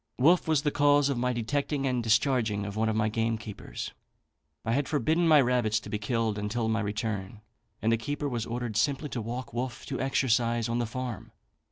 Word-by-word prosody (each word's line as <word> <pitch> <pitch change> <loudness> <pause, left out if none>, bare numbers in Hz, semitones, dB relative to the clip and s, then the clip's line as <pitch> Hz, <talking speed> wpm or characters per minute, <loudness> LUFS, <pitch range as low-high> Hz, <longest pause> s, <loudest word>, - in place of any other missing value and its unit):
"Wolfe 165 +8 +4
was 155 -3 +2
the 150 - +1
cause 145 -1 +4
of 140 - 0
my 125 +1 +1
detecting 135 +4 -1
and 125 -2 +1
discharging 115 -2 +2
one 110 +2 0
of 110 - 0
my 110 0 +2
gamekeepers. 115 -1 -3 0.7
I 115 - 0
had 140 +3 +1
forbidden 160 +4 +2
my 155 -2 +7
rabbits 120 -4 +2
to - - -9
be 105 - -1
killed 110 -1 -1
until 110 +3 -1
my 110 0 +1
return; 105 -1 -3 0.4
and 110 - +3
the 115 - +3
keeper 145 +5 -3
was 120 -4 -3
ordered 120 -2 -3
simply 140 +5 +1
to 120 - -3
walk 120 +3 -5
Wolfe 120 +1 -4
to 135 - -4
exercise 120 -3 +1
on 120 +1 -1
the 120 - -1
farm. 125 -3 -5
120 Hz, 195 wpm, -28 LUFS, 110-135 Hz, 0.7 s, my